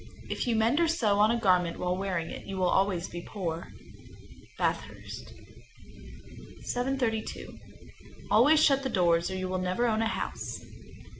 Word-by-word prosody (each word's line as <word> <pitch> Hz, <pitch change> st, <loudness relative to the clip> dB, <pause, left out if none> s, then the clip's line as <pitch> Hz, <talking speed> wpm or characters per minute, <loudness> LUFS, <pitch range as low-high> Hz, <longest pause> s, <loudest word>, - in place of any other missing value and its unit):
If -, -, -2 dB
you 235 Hz, -, +2 dB
mend 225 Hz, +7 st, +3 dB
or 340 Hz, -, +4 dB
sew 220 Hz, -11 st, +2 dB
on 210 Hz, +1 st, +6 dB
a 235 Hz, +1 st, +1 dB
garment 180 Hz, -5 st, +2 dB
while 180 Hz, 0 st, -1 dB
wearing 185 Hz, -3 st, -2 dB
it, -, -, -8 dB
you 195 Hz, -1 st, -5 dB
will 185 Hz, -1 st, +2 dB
always 190 Hz, -3 st, +1 dB
be 175 Hz, -, -7 dB
poor. 170 Hz, -4 st, -4 dB, 0.9 s
Bathurst, -, -, -3 dB, 0.5 s
N.B. -, -, -15 dB
732. 245 Hz, -3 st, -2 dB, 0.7 s
Always 265 Hz, +9 st, +6 dB
shut 275 Hz, -2 st, +4 dB
the 265 Hz, -, -2 dB
doors, 170 Hz, -5 st, +2 dB
or 190 Hz, -, -4 dB
you 185 Hz, 0 st, -2 dB
will 185 Hz, 0 st, -2 dB
never 185 Hz, +6 st, 0 dB
own 220 Hz, -2 st, +1 dB
a 225 Hz, -, +2 dB
house. -, -, -4 dB
200 Hz, 160 wpm, -29 LUFS, 180-235 Hz, 0.9 s, on